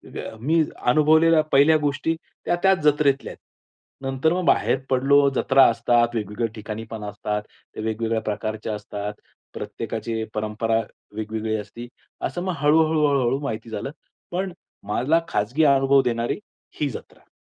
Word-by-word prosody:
ग - - -6
मी 160 +6 +2 0.2
अनुभवलेल्या 155 +4 +5
पहिल्या 145 +3 +6
गोष्टी 145 +2 -1 0.3
त्या 175 - +2
त्याच 190 -1 +4
जत्रेतल्या. 145 -2 +2 0.7
नंतर 135 +4 0
मग 180 0 -1
बाहेर 135 - +3
पडलो, 140 +2 +4
जत्रा 135 +1 +5
असतात, 120 0 +2
वेगवेगळ्या 105 +2 -2
ठिकाणी 110 +1 -6
पण 110 -2 -6
असतात, 105 +1 -3 0.3
ते - - -5
वेगवेगळ्या 110 0 -1
प्रकारच्या 110 +1 -3
असतात. 105 0 -5 0.4
प्रत्येकाची 115 -1 -4
परंपरा 110 +1 0 0.4
वेगवेगळी 110 0 -3
असते. 115 +4 -8 0.3
असं 175 - -3
मग 185 - -1
हळू-हळू, 155 +1 +3
हळू-हळू 135 -2 +1
माहिती 115 -5 -5
झालं. 110 +5 -4 0.4
पण 185 +2 -2 0.4
मला 130 +10 +2
खाजगी 110 +9 0
अनुभव 135 -1 +5
देणारी 120 -2 -1 0.4
ही 145 -2 +1
जत्रा. - - -11
125 Hz, 135 wpm, -23 LUFS, 110-150 Hz, 0.7 s, पहिल्या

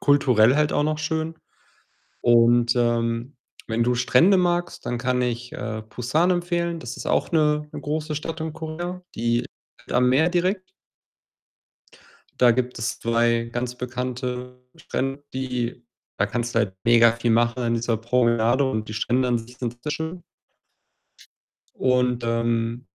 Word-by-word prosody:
kulturell 130 -5 +4
halt 150 0 +2
auch 145 - +1
noch 155 0 0
schön 160 +1 -2 0.9
und, 120 0 +4
ähm, 120 +1 0 0.3
wenn 115 +1 +1
du 125 +1 +2
Strände 125 +10 +4
magst, 175 -1 0
dann 120 - -1
kann 125 +1 0
ich, 125 0 -3
äh, 110 -1 -5
Busan 150 +11 +1
empfehlen. 175 -1 -1
Das 125 -4 -7
ist - - -7
auch - - +1
'ne 150 -2 +2
'ne - - -7
große 155 +1 -3
Stadt 160 +2 -5
in 160 -1 -4
Korea, 170 +3 -5
die 120 +1 +1
liegt - - -13
am 125 +1 +4
Meer 150 +7 +3
direkt. 185 +2 0 1.8
Da 125 -1 +7
gibt 125 +1 -2
es 115 +2 -3
2 115 0 +1
ganz 125 +1 -3
bekannte 125 0 -5 0.2
Strände, 135 +2 -3
die 125 -2 -3 0.4
da 100 - +4
kannst 120 +2 -3
du - - +3
halt 100 -4 -1
mega 115 -1 +6
viel 115 0 -1
machen 120 +2 +2
an 115 -1 +1
dieser 115 0 0
Promenade 120 +2 +2
und 110 -4 -3
die - - -5
Strände 125 +4 +1
an 120 -1 +2
sich 120 +2 -12
sind 120 -1 -4
sehr 150 - -1
schön. 160 +3 -5 1.5
Und, 125 -1 +1
ähm, 115 +1 -1
125 Hz, 155 wpm, -24 LUFS, 115-150 Hz, 1.8 s, Da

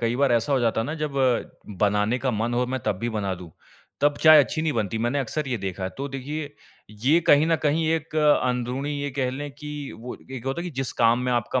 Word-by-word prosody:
कई 115 0 0
बार 135 -1 +3
ऐसा 120 +4 +1
हो 135 - +3
जाता 115 -1 +1
है 115 - -1
ना 150 - -3
जब 150 -2 -2 0.7
बनाने 105 +3 +2
का 130 0 0
मन 115 +1 -1
हो 125 +1 +2
मैं 130 +1 -3
तब 95 - 0
भी 120 - -2
बना 100 -4 -2
दूँ, 90 -2 -11 0.5
तब 145 0 +3
चाय 155 -1 +9
अच्छी 155 +3 -3
नहीं 160 -2 0
बनती 110 -2 -1
मैंने 120 +5 0
अक्सर 135 +3 -3
ये 125 - -1
देखा। 95 -1 -4
तो 140 +8 -6
देखिए 145 +3 -5 0.5
ये 155 +7 +4
कहीं 145 +2 +6
न 165 - +3
कहीं 155 +2 +1
एक 160 0 -4
अंदरूनी 130 -2 +1
ये 145 0 -2
कह 130 -2 0
लें 145 +3 -5
कि 150 0 -7
वो 125 +2 -7
एक 130 -3 -7
होता 135 +5 -2
है - - -5
कि 180 - -4
जिस 135 - -3
काम 115 +1 +5
में 125 - +1
आपका 120 +2 0
130 Hz, 245 wpm, -24 LUFS, 115-145 Hz, 0.7 s, चाय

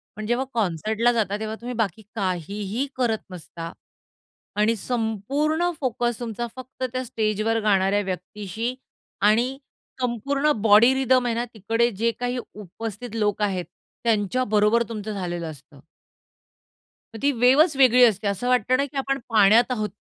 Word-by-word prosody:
पण 215 - -6
जेव्हा 240 +4 0
कॉन्सर्टला 220 +3 +1
जाता 215 -4 0
तेव्हा 220 0 -4
तुम्ही 245 +1 -5
बाकी 220 -2 -1
काहीही 200 - -2
करत 240 -4 +1
नसता 165 -1 -8 0.8
आणि 210 +2 +2
संपूर्ण 255 - -1
फोकस 240 -3 -1
तुमचा 240 0 -4
फक्त 260 0 -9
त्या 255 0 -2
स्टेजवर 220 0 0
गाणाऱ्या 200 -1 +2
व्यक्तीशी 205 +5 -4 0.5
आणि 245 +5 +1 0.4
संपूर्ण 275 +5 0
बॉडी 220 +4 +6
रिथम 260 -1 +2
आहे 235 -1 0
ना, 235 - -1
तिकडे 225 +3 +1
जे 230 +3 0
काही 245 +1 -2 0.2
उपस्थित 215 +3 -7
लोक 210 -2 0
आहेत, 190 -4 0 0.4
त्यांच्या 225 +2 +1
बरोबर 210 +3 +4
तुमचं 215 -1 -5
झालेलं 175 -4 -4
असतं. 140 0 -16 1.4
मग 225 - -7
ती 285 - +4
वेव्हच 275 +6 +5
वेगळी 250 -2 +6
असते 215 -3 +2
असं 200 +5 -2
वाटतं 250 0 +3
ना, 280 - +1
की 280 0 -10
आपण 275 0 -1
पाण्यात 220 +1 +6
आहोत 215 -3 -1
225 Hz, 145 wpm, -24 LUFS, 205-245 Hz, 1.4 s, बॉडी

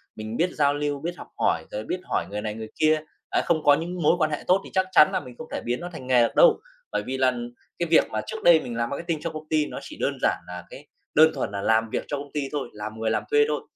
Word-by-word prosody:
mình 110 +1 -5
biết 180 +2 +2
giao 145 -1 +2
lưu, 145 -1 -2
biết 175 +3 -4
học - - -10
hỏi, - - +1
rồi 105 - -4
biết 180 - -3
hỏi - - -1
người 105 - -3
này 105 0 -3
người 110 0 -7
kia, 155 0 +4 0.3
à, - - +1
không 160 -2 +1
có 145 - +7
những 175 +3 -4
mối 150 - +5
quan 155 -3 +1
hệ 150 - -3
tốt 190 +2 +4
thì - - -9
chắc 190 0 +2
chắn 150 - +7
là - - +2
mình 125 -3 -11
không 160 - -8
thể - - -2
biến 120 +1 -1
nó 175 - -5
thành 130 -5 -8
nghề 125 -2 +5
được - - -1
đâu. 475 -3 +6 0.3
Bởi - - -1
vì 130 +1 -3
là 130 -1 +3 0.5
cái 170 - 0
việc 165 - +7
mà 110 0 -1
trước - - -6
đây 170 -2 +7
mình 120 - -6
làm 120 0 -1
marketing 165 +2 -3
cho 165 - -2
công 155 -1 -8
ty 155 -1 +2
nó - - -6
chỉ - - -10
đơn - - 0
giản - - +2
là 90 -1 -7
cái 145 +2 -12 0.3
đơn 155 +1 +7
thuần - - -3
là 100 -1 -4
làm 110 +1 +2
việc - - -2
cho 145 - -2
công 140 0 -8
ty 150 - -1
thôi, 140 -5 -3
làm 105 +1 -7
người 110 0 0
làm 105 - 0
thuê 145 0 +5
thôi. 150 -1 -1
145 Hz, 300 wpm, -25 LUFS, 115-160 Hz, 0.5 s, có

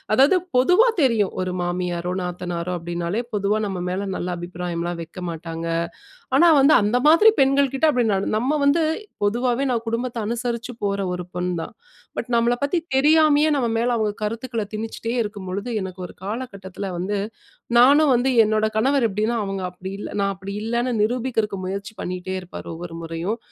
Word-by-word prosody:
அதாவது 280 +8 +5 0.2
பொதுவா 360 - +5
தெரியும், 225 -7 +2
ஒரு 185 0 -3
மாமியாரோ 175 0 -2
நாத்தனாரோ 180 0 -3
அப்பிடினாலே, 175 +6 -3
பொதுவா 205 +1 +1
நம்ம 185 -2 -4
மேல 195 +2 -2
நல்ல 180 - -3
அபிப்பிராயம்லாம் 175 -1 -4
வைக்க 170 +3 -9
மாட்டாங்க. 165 0 -6 0.7
ஆனா 340 -1 +7
வந்து, 285 +3 +6
அந்த 230 +5 +2
மாதிரி 420 +8 +7
பெண்கள்கிட்ட 275 +2 +3
அப்பிடி 245 -5 +1
நடந் 195 +2 0
நம்ம 260 +6 0
வந்து 320 +3 +4 0.4
பொதுவாவே 245 +5 +1
நான் 230 -1 -2
குடும்பத்த 235 +1 -2
அனுசரிச்சு 235 0 -3
போற 200 0 0
ஒரு 180 0 -5
பொண் 180 0 -1
தான். - - -8 0.4
பட், 245 - -4
நம்மள 235 +1 +3
பத்தி 350 - 0 0.2
தெரியாமையே 305 +1 +5
நம்ம 260 -4 +1
மேல 240 +2 +1
அவுங்க 215 -2 0
கருத்துக்கள 230 +1 -2
திணிச்சிட்டே 225 +1 -4
இருக்கும்பொழுது, 200 +1 -5
எனக்கு 190 -1 -6
ஒரு - - -14
காலகட்டத்தில 200 -3 -5
வந்து, 200 +3 -2 0.6
நானும் 280 +4 +6
வந்து 245 +2 +2 0.2
என்னோட 215 0 +1
கணவர் 265 +3 +3
எப்பிடின்னா 215 +4 -1
அவுங்க 195 -1 -4
அப்பிடி 185 +1 -8
இல்ல, - - -5
நான் 200 0 +1
அப்பிடி 195 +1 -8
இல்லன்னு 240 +2 0
நிரூபிக்கிறதுக்கு 225 -3 0
முயற்சி 200 +3 -4
பண்ணிட்டே 180 +1 -4
இருப்பாரு, 180 - -9
ஒவ்வொரு 170 0 -8
முறையும். 165 +7 -3
215 Hz, 160 wpm, -22 LUFS, 180-250 Hz, 0.7 s, ஆனா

